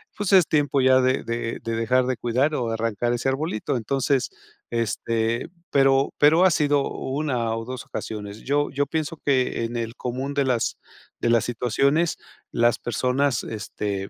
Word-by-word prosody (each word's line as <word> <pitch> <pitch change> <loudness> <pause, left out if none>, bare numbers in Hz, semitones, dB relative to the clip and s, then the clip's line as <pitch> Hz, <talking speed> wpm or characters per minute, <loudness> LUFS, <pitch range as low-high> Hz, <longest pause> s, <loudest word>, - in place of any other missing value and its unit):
Pues, 205 -1 -2
es 185 -4 +7
tiempo 145 -3 +2
ya 130 0 +5
de 130 +1 +1
de 115 0 -3
de 115 0 -2
dejar 125 +3 +2
de 130 -1 -1
cuidar 130 +6 +1
o 120 -2 -1
de - - -1
arrancar 115 +1 -1
ese 125 +2 0
arbolito. 135 -3 -2
Entonces, 130 +2 0 0.4
este, 115 0 -1 0.2
pero 135 0 +3
pero 160 +5 +6
ha 185 - +5
sido 145 -3 +2
1 130 -5 -2
o 115 0 -5
2 130 -1 -6
ocasiones. 105 0 -6
Yo 145 +2 +1
yo 145 0 0
pienso 155 +2 -3
que 130 -4 +1
en 115 +1 -4
el 115 +1 -4
común 130 +3 -4
de 140 - +2
las 125 -3 0 0.4
de 120 - 0
las 115 - +3
situaciones, 135 +7 +1 0.3
las 120 0 +2
personas, 125 +2 0
este, 100 -2 -4
125 Hz, 170 wpm, -24 LUFS, 115-140 Hz, 0.4 s, es